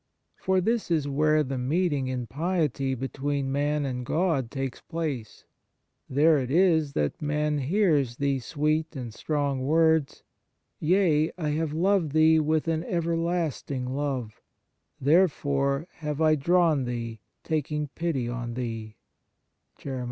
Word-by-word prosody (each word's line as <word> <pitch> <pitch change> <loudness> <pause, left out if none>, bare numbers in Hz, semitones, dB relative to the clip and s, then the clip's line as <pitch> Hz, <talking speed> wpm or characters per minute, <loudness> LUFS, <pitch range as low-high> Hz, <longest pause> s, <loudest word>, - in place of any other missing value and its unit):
For 190 0 +1
this 225 +2 0
is 155 -4 +1
where 155 +2 +2
the 135 -2 -3
meet 160 +7 +1
ing 135 -2 -1
in 125 -1 -3
piety 145 - -1
between 135 +2 -2
man 145 +1 0
and 125 -2 -3
God 155 -3 0
takes 135 -1 -4
place; 150 -10 -5 0.6
there 150 +3 +4
it 125 -2 -3
is 160 -2 +3
that 75 -1 -1
man 150 0 0
hears 145 - +1
these 140 -3 0
sweet 155 +3 -1
and 120 -4 -6
strong 145 0 -1
words: 160 0 +2 0.3
" - - -51 0.2
Yea, 160 -2 +3
I 155 -4 -2
have 155 0 -1
loved 175 -2 +1
thee 160 0 +5
with 155 +1 +1
an 165 0 0
ever 170 -1 -1
lasting 160 -6 -2
love; 135 -6 -3 0.6
therefore 140 -2 +2
have 150 -2 -4
I 155 -1 +4
drawn 155 -2 +2
thee, 115 -2 -4 0.2
taking 150 -1 -2
pity 150 -5 -2
on 120 -1 -4
thee. 115 -3 -5
150 Hz, 135 wpm, -27 LUFS, 135-160 Hz, 0.6 s, thee